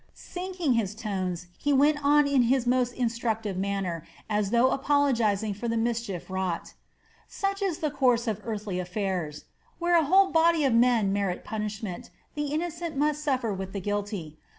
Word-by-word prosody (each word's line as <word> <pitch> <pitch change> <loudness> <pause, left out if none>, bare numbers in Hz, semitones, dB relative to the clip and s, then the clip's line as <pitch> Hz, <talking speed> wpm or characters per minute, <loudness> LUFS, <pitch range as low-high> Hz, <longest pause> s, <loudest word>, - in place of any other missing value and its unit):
Sinking 360 -5 -2
his 210 -4 0
tones, 185 -5 -3
he 290 - 0
went 290 +2 +3
on 295 +1 +5
in 280 -2 +3
his 260 -1 +2
most 250 0 +2
instructive 225 -4 -1
manner, 190 -4 -2 0.2
as 210 -2 0
though 240 +3 +4
apologizing 235 -8 +1
for 210 +4 -5
the 230 0 0
mischief 225 -6 -2
wrought: 185 -3 -3 0.5
"Such 395 0 -2
is 380 -5 0
the 300 - 0
course 250 -4 +2
of 215 -1 -2
earthly 210 -4 -3
affairs! 180 -5 -3 0.3
Where 345 0 +2
a 330 -2 +4
whole 380 +5 +5
body 325 -2 +4
of 260 - +3
men 230 -4 +3
merit 200 -3 -1
punishment, 215 0 -5 0.2
the 295 0 -2
innocent 330 +1 -3
must 300 +1 +1
suffer 255 -7 0
with 190 0 -6
the 200 - -2
guilty. 200 -5 -4
230 Hz, 165 wpm, -27 LUFS, 200-285 Hz, 0.5 s, on